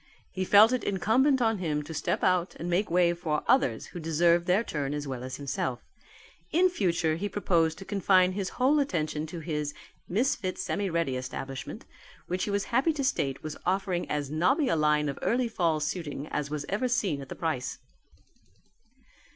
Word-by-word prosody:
He 185 Hz, 0 st, -2 dB
felt 210 Hz, +4 st, +7 dB
it 255 Hz, -, -1 dB
incumbent 245 Hz, -, +2 dB
on 225 Hz, -3 st, +1 dB
him 150 Hz, -4 st, -1 dB
to 160 Hz, -, -8 dB
step 160 Hz, -, -1 dB
out 180 Hz, -1 st, +2 dB
and 170 Hz, -, -6 dB
make 180 Hz, +4 st, +1 dB
way 175 Hz, 0 st, +3 dB
for 165 Hz, -3 st, -2 dB
others 270 Hz, +1 st, +2 dB
who 175 Hz, -, -5 dB
deserved 170 Hz, +2 st, +2 dB
their 190 Hz, +5 st, +3 dB
turn 145 Hz, -7 st, -3 dB
as 145 Hz, -1 st, -4 dB
well 130 Hz, -2 st, -5 dB
as 130 Hz, 0 st, -5 dB
himself: 130 Hz, -2 st, -3 dB, 0.7 s
in 365 Hz, +3 st, +4 dB
future 170 Hz, -, 0 dB
he 205 Hz, +4 st, -3 dB
proposed 165 Hz, -6 st, +1 dB
to 195 Hz, -, -9 dB
confine 185 Hz, -2 st, +3 dB
his 190 Hz, 0 st, -3 dB
whole 270 Hz, +4 st, +4 dB
attention 155 Hz, -, -1 dB
to 165 Hz, +1 st, -7 dB
his 150 Hz, -2 st, -3 dB, 0.3 s
Misfit 200 Hz, -2 st, 0 dB
Semi 190 Hz, +2 st, -2 dB
Ready 165 Hz, -6 st, 0 dB
Establishment 130 Hz, +1 st, -6 dB, 0.4 s
which 180 Hz, +1 st, -2 dB
he -, -, -4 dB
was 200 Hz, 0 st, 0 dB
happy 275 Hz, +7 st, +3 dB
to 290 Hz, -2 st, -3 dB
state 140 Hz, -, -1 dB
was 155 Hz, -1 st, -5 dB
offering 185 Hz, -1 st, -1 dB
as 145 Hz, -2 st, -2 dB
nobby 255 Hz, -, +2 dB
a -, -, +2 dB
line 150 Hz, -1 st, +2 dB
of 140 Hz, -, -4 dB
early 245 Hz, +2 st, +1 dB
fall 170 Hz, -8 st, 0 dB
suiting 150 Hz, -2 st, -3 dB
as 145 Hz, -1 st, -2 dB
was 150 Hz, -1 st, -4 dB
ever 210 Hz, +6 st, 0 dB
seen 200 Hz, -, 0 dB
at 135 Hz, -, -10 dB
the -, -, -6 dB
price." 155 Hz, -6 st, -2 dB
175 Hz, 185 wpm, -28 LUFS, 150-205 Hz, 0.7 s, felt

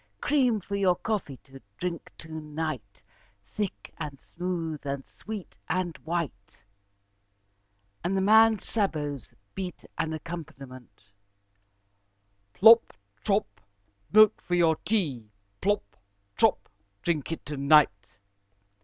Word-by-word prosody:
Cream 255 Hz, -7 st, +2 dB
for 200 Hz, +1 st, -5 dB
your 190 Hz, -3 st, +3 dB
coffee 195 Hz, -, -3 dB
to 135 Hz, 0 st, -14 dB, 0.2 s
drink 175 Hz, -2 st, -4 dB
to 160 Hz, -, -11 dB
night, 150 Hz, -8 st, -5 dB, 0.4 s
thick, 200 Hz, -, -5 dB
and 145 Hz, -4 st, -6 dB
smooth, 170 Hz, -4 st, -4 dB
and 140 Hz, -1 st, -4 dB
sweet, 215 Hz, -3 st, -9 dB
and 175 Hz, -1 st, -1 dB
white," 160 Hz, -12 st, -4 dB, 1.5 s
and 185 Hz, +3 st, 0 dB
the -, -, +2 dB
man's 220 Hz, +1 st, +5 dB
sabots 150 Hz, -, -2 dB, 0.2 s
beat 185 Hz, -3 st, -6 dB
an 160 Hz, 0 st, 0 dB
accompaniment: 150 Hz, -, -8 dB, 1.5 s
"Plop! 225 Hz, +4 st, +7 dB, 0.3 s
trop! 205 Hz, 0 st, +2 dB, 0.7 s
milk 215 Hz, 0 st, +6 dB
for 175 Hz, -, -1 dB
your 165 Hz, -2 st, +4 dB
tea. 145 Hz, -, -1 dB, 0.3 s
Plop! 205 Hz, +2 st, +2 dB, 0.5 s
trop! -, -, +2 dB, 0.4 s
drink 165 Hz, -3 st, -1 dB
it 165 Hz, -, -5 dB
to 150 Hz, -, -5 dB
night." 140 Hz, -8 st, +4 dB
170 Hz, 110 wpm, -28 LUFS, 145-195 Hz, 1.5 s, Plop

